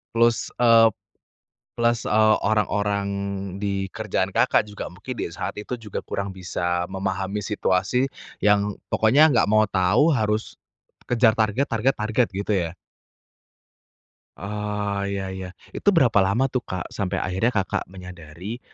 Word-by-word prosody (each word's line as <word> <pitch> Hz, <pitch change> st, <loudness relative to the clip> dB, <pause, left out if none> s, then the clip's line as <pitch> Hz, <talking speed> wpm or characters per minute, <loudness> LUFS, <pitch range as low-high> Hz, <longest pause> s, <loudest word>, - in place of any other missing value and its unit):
Plus, 115 Hz, 0 st, +2 dB
eee, 115 Hz, -2 st, +6 dB, 0.8 s
plus, 120 Hz, -1 st, +1 dB
eee, 110 Hz, 0 st, +4 dB
orang-orang 100 Hz, -1 st, 0 dB, 0.5 s
di 100 Hz, -1 st, -2 dB
kerjaan -, -, -2 dB
Kakak -, -, +3 dB
juga 105 Hz, -1 st, -7 dB
mungkin 100 Hz, +8 st, -9 dB
di -, -, -1 dB
saat 85 Hz, -, -4 dB
itu 105 Hz, +4 st, -4 dB
juga 110 Hz, -4 st, -6 dB
kurang 100 Hz, -1 st, -4 dB
bisa 90 Hz, -1 st, -2 dB
memahami 95 Hz, +1 st, -3 dB
situasi 105 Hz, +5 st, +1 dB, 0.3 s
yang 105 Hz, 0 st, +3 dB, 0.2 s
pokoknya 135 Hz, +8 st, +5 dB
nggak 115 Hz, -, +4 dB
mau 110 Hz, 0 st, +4 dB
tahu 100 Hz, -, +3 dB
harus, 110 Hz, -2 st, -1 dB, 0.5 s
kejar 115 Hz, -2 st, +3 dB
target, 110 Hz, +5 st, +1 dB
target, 120 Hz, +3 st, +1 dB
target, 110 Hz, +3 st, +1 dB
gitu 100 Hz, +2 st, -4 dB
ya? 85 Hz, -3 st, -1 dB, 1.7 s
Oh 105 Hz, +1 st, -3 dB
iya 100 Hz, -1 st, -3 dB
iya. 95 Hz, -1 st, -6 dB, 0.3 s
Itu -, -, +2 dB
berapa 135 Hz, -, +3 dB
lama 115 Hz, +8 st, +2 dB
tuh 125 Hz, -2 st, -2 dB
Kak? 90 Hz, -2 st, -5 dB
Sampai 95 Hz, -3 st, -3 dB
akhirnya 95 Hz, +6 st, 0 dB
Kakak 100 Hz, -5 st, -1 dB
menyadari, 90 Hz, +3 st, -9 dB
105 Hz, 135 wpm, -23 LUFS, 95-115 Hz, 1.7 s, eee